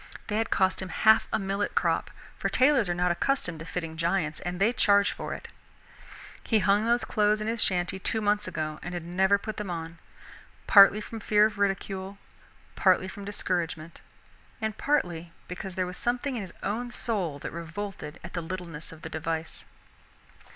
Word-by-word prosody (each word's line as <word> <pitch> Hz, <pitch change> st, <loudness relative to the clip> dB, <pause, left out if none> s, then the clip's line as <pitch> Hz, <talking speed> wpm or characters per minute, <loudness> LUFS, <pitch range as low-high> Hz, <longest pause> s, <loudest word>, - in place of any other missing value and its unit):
They 210 Hz, -, 0 dB
had 225 Hz, -, -1 dB
cost 190 Hz, 0 st, +2 dB
him 190 Hz, -, -5 dB
half 220 Hz, +4 st, +4 dB
a -, -, +2 dB
millet 195 Hz, 0 st, -2 dB
crop; -, -, +1 dB, 0.3 s
for -, -, -2 dB
tailors 260 Hz, -6 st, +4 dB
are 175 Hz, -, 0 dB
not 180 Hz, 0 st, +2 dB
accustomed 180 Hz, -, -1 dB
to 165 Hz, -, -7 dB
fitting 165 Hz, -2 st, -5 dB
giants 165 Hz, -2 st, 0 dB
and 180 Hz, 0 st, -4 dB
they 215 Hz, +5 st, +3 dB
charge 200 Hz, -3 st, +4 dB
for -, -, -5 dB
it. -, -, -9 dB, 1.0 s
He 225 Hz, -, +2 dB
had 210 Hz, -, 0 dB
hung 205 Hz, +2 st, +4 dB
those 240 Hz, +1 st, +2 dB
clothes 210 Hz, 0 st, +2 dB
in 215 Hz, -, -3 dB
his 225 Hz, 0 st, -1 dB
shanty 180 Hz, +1 st, 0 dB
two 220 Hz, -, +1 dB
months 210 Hz, 0 st, +1 dB
ago 155 Hz, -1 st, -3 dB
and 175 Hz, 0 st, -5 dB
had 175 Hz, -, -4 dB
never 190 Hz, +3 st, +3 dB
put 215 Hz, +1 st, -6 dB
them 210 Hz, -3 st, -4 dB
on, 165 Hz, -1 st, -5 dB, 0.7 s
partly 200 Hz, +1 st, +8 dB
from 225 Hz, +1 st, -7 dB
fear 210 Hz, 0 st, +4 dB
of 210 Hz, -1 st, -2 dB
ridicule, 195 Hz, 0 st, -1 dB, 0.6 s
partly 185 Hz, -1 st, +3 dB
from 200 Hz, +1 st, -8 dB
discouragement, 170 Hz, -5 st, -3 dB, 0.6 s
and 220 Hz, -2 st, -2 dB
partly 175 Hz, -, -1 dB
because 180 Hz, 0 st, -6 dB
there 185 Hz, -, 0 dB
was 180 Hz, 0 st, -6 dB
something 250 Hz, +1 st, -1 dB
in 230 Hz, -, -2 dB
his 185 Hz, -4 st, -8 dB
own 235 Hz, +5 st, -2 dB
soul 195 Hz, -11 st, -1 dB
that -, -, -6 dB
revolted 170 Hz, -1 st, -6 dB
at 170 Hz, -, -9 dB
the 170 Hz, -, -2 dB
littleness 165 Hz, -2 st, -6 dB
of 160 Hz, -1 st, -13 dB
the 160 Hz, -, -5 dB
device. 160 Hz, 0 st, -4 dB
190 Hz, 185 wpm, -28 LUFS, 170-210 Hz, 1.0 s, partly